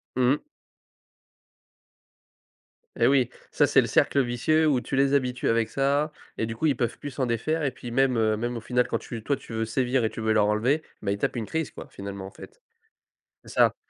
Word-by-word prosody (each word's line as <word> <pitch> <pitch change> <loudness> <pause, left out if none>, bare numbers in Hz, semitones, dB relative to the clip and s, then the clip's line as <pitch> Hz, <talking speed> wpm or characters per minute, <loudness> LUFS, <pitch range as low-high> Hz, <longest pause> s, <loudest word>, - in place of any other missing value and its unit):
Mmh. 130 +3 +3 2.6
Et - - +3
oui! 130 -3 +3 0.2
Ça - - +3
c'est - - +5
le - - -2
cercle 140 - +3
vicieux 155 +7 +2
où 130 -5 +2
tu - - -4
les 135 +1 +3
habitues 125 -3 0
avec 115 -1 +2
ça 140 +3 +1 0.3
et 110 - 0
du 115 - -5
coup 160 - -2
ils 145 - +3
peuvent 120 -1 -2
plus 145 - -7
s'en 130 -2 -1
défaire 155 +8 -1
et 135 - +1
puis 120 -1 -9
même, 130 -1 +2
heu, 110 -1 +2
même 120 +2 -3
au 115 - -6
final 125 +2 +1
quand - - 0
tu 115 -2 -7
toi 140 - +1
tu 115 - -11
veux 115 0 -1
sévir 125 +1 0
et 110 - +2
tu 115 - -7
veux 110 0 +2
leur 105 -1 +3
enlever, 120 +9 +2 0.2
bah 100 - 0
ils 100 - -1
tapent - - -1
une 115 -3 -2
crise 160 +4 -2
quoi! - - -10
Finalement 100 -1 -7
en 95 - -9
fait. 445 +4 -13 0.8
C'est - - -12
ça. - - +4
125 Hz, 220 wpm, -26 LUFS, 115-140 Hz, 2.6 s, c'est